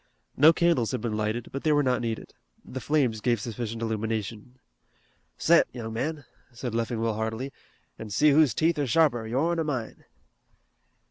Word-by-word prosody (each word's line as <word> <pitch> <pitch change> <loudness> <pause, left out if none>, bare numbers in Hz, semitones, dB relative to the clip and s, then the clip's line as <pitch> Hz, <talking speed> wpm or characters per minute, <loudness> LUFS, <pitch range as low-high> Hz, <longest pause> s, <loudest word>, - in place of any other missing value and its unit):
No 150 +4 +7
candles 165 -8 +1
had 125 - -2
been 115 -3 -2
lighted, 110 +2 -2
but 135 - -5
they 155 - +2
were 145 -1 +3
not 125 -2 +1
needed. 115 -2 -4 0.3
The 130 - -6
flames 130 -8 +1
gave 120 -1 +1
sufficient 115 +1 -5
illumination. 110 +1 -3 0.8
"Set, - - +4
young 110 -2 -5
man," 145 +4 -3 0.3
said 120 0 -5
Leffingwell 115 -1 -1
heartily, 110 +5 -3 0.5
"an' 110 - -7
see 150 +9 +4
who's 145 -4 +4
teeth 160 -1 +1
are 145 - 0
sharper, 120 -4 +2
yourn 160 +9 0
or - - +1
mine." 130 -7 -4
120 Hz, 160 wpm, -27 LUFS, 110-145 Hz, 0.8 s, No